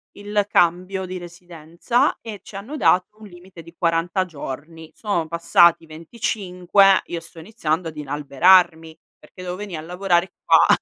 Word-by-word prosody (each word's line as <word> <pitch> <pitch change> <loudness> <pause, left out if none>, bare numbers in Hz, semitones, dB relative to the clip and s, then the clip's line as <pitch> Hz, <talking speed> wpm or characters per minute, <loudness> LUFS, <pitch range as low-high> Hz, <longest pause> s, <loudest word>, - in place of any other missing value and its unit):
il 205 0 -2
cambio 185 +1 +1
di 185 0 -6
residenza 175 - -2
e 220 -3 -8
ci - - -13
hanno 225 +10 -7
dato 185 -4 +2
un 215 - -12
limite 175 -2 -14
di 170 +1 -15
40 170 +2 0
giorni. 160 0 -9
Sono 200 -7 -2
passati 170 0 +3
25, 185 +2 +1
io 170 - -5
sto 165 0 -12
iniziando 165 -3 -3
ad 155 -1 -9
inalberarmi, 160 +3 +2 0.2
perché 185 - -15
devo 180 -1 -5
venì 200 -2 -7
a 155 - -6
lavorare 180 +1 -1
qua - - +5
175 Hz, 150 wpm, -21 LUFS, 165-195 Hz, 0.2 s, qua